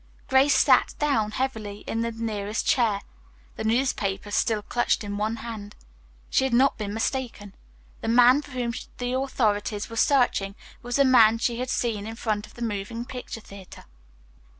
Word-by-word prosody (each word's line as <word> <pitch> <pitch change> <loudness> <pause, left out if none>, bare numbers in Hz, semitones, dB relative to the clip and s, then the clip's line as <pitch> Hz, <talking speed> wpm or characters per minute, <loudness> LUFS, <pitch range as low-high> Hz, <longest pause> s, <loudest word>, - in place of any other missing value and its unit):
Grace 270 +2 +4
sat - - +4
down 275 -8 +1
heavily 215 -4 -4
in 225 - -2
the 230 0 -1
nearest 220 -2 -3
chair, 220 -5 +2 0.5
the - - -5
newspaper 220 -4 0
still 215 -1 +1
clutched 240 +1 0
in 205 0 -4
one 215 +2 -1
hand. 210 -3 -7 0.6
She - - +3
had 265 -3 +1
not 265 +3 +4
been 205 -2 -4
mistaken. 225 -2 -3 0.5
The - - -4
man 245 +4 +6
for 290 - -14
whom 245 -3 -3 0.2
the 245 0 -2
authorities 220 -6 -1
were - - -6
searching 230 -6 +2 0.3
was 245 0 -4
the 280 - +4
man 230 -4 +6
she 235 0 -1
had 255 0 -3
seen 220 -5 -1
in 225 - -6
front 215 -2 -2
of - - -20
the 240 - -5
moving 225 +2 -4
picture 250 -3 -7
theatre. 195 -2 -13
230 Hz, 170 wpm, -25 LUFS, 210-250 Hz, 0.6 s, man